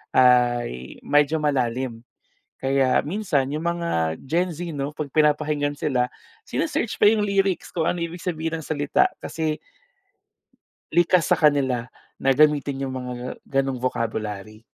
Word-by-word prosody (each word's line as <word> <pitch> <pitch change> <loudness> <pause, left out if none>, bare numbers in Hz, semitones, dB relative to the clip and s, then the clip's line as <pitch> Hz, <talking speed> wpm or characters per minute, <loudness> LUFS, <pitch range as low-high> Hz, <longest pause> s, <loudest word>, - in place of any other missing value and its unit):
ay 120 - +3
medyo 145 +2 +3
malalim. 125 -4 -1 0.6
Kaya 135 -1 +3
minsan 155 -6 0
yung 155 +2 -3
mga 170 - 0
GenZ 170 +3 -1
'no, 140 0 -3
'pag 150 -1 -4
pinapakinggan 150 -1 +2
sila, 125 -4 +1 0.4
sine-search 305 -8 -1
pa 205 - +9
yung 215 -1 +2
lyrics 195 -2 0
kung 165 -2 +1
ano 175 - -3
ibig 170 +1 -5
sabihin 165 -2 -2
ng - - -10
salita, 145 -2 +2
kasi 155 -1 -2 1.3
likas 175 0 +3
sa - - +4
kanila 135 -6 +2 0.3
na 135 0 +2
gamitin 145 -1 +3
yung 130 -1 -3
mga 125 0 -6
gano'ng 135 -1 0
vocabulary. 110 -4 -3
145 Hz, 130 wpm, -24 LUFS, 125-160 Hz, 1.3 s, pa